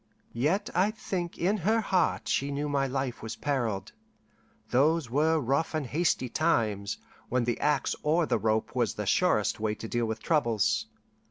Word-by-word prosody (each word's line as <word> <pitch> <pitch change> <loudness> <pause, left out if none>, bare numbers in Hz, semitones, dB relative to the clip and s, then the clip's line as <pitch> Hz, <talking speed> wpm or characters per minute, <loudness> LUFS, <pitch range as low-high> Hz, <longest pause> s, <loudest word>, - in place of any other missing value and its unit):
Yet 185 - 0
I 185 +4 +3
think 185 -5 -4
in 195 +5 +1
her 215 +5 +2
heart 190 -4 +1
she 140 - 0
knew 145 +1 -2
my 140 -1 +1
life 130 -2 -3
was 110 0 -5
perilled: 120 -9 -2 0.8
those 145 0 +2
were 155 +4 +3
rough 140 +5 0
and 155 -3 -1
hasty 145 -2 0
times, 110 -9 0 0.3
when 125 0 +1
the 120 -1 -1
axe 150 -3 +1
or 160 +3 +2
the 120 -5 0
rope 110 +2 0
was 120 -4 +1
the 105 - -3
surest 110 - +2
way 110 0 -1
to 115 - -7
deal 120 0 -1
with 110 +1 -3
troubles. 120 -10 +1
140 Hz, 170 wpm, -28 LUFS, 115-165 Hz, 0.8 s, I